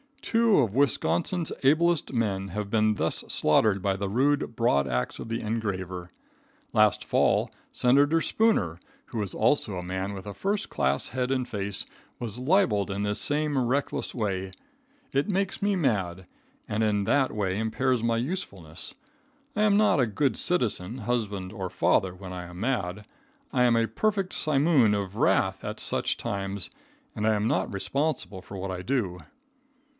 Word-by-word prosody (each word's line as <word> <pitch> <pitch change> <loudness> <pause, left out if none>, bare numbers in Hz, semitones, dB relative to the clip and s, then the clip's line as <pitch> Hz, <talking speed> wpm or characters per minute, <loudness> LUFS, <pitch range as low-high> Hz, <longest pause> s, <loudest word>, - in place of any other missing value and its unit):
Two 230 -4 +3
of 115 -7 +1
Wisconsin's 140 - +1
ablest 160 +2 +3
men 100 -5 -1
have 105 +2 -4
been 110 -1 +3
thus 80 -3 -1
slaughtered 95 +6 +3
by 95 0 +1
the 100 0 -3
rude 135 +2 +1
broad 70 - +2
axe 60 -1 -2
of 115 - -7
the 115 - -2
engraver. 95 -5 -3 0.6
Last - - +4
fall, - - +2 0.2
Senator 145 +6 +4
Spooner, 130 - +1 0.3
who 115 - -3
is 100 -3 -4
also 110 -3 +2
a 90 - -4
man 95 +2 -3
with 95 0 -8
a 100 - -6
first 200 - -1
class 70 +1 0
head 130 -1 -2
and 130 -2 0
face, 100 -3 -2 0.3
was 120 -1 -5
libeled 125 - +2
in 100 +1 -2
this 105 0 0
same 150 -1 0
reckless 135 +3 -1
way. 95 -5 -2 0.6
It 140 +1 +1
makes 195 -1 -1
me 200 0 +2
mad, 95 - 0 0.4
and 105 - -1
in 105 -2 +2
that 135 +5 +2
way 100 -2 -1
impairs 125 +2 0
my 115 0 +1
usefulness. 100 - -4 0.6
I 210 - +2
am 210 -1 +4
not 210 -7 +4
a 125 - +3
good 130 +6 0
citizen, 120 - 0
husband 105 -5 -2
or 95 -4 -4
father 90 +1 +1
when 90 0 -8
I 90 -1 -6
am 90 +1 -10
mad. 105 -4 -2 0.5
I 125 - +3
am 120 -1 +4
a 115 0 +3
perfect 200 - -1
simoom 140 -6 +3
of 100 0 -5
wrath - - +2
at - - -5
such - - +1
times, 100 -1 -4 0.4
and 105 +1 0
I 110 - +4
am 105 +1 0
not 95 -4 0
responsible 130 -1 -2
for 100 - -9
what 95 0 -4
I 90 -1 -4
do. 100 -7 -1
110 Hz, 165 wpm, -27 LUFS, 95-135 Hz, 0.6 s, Last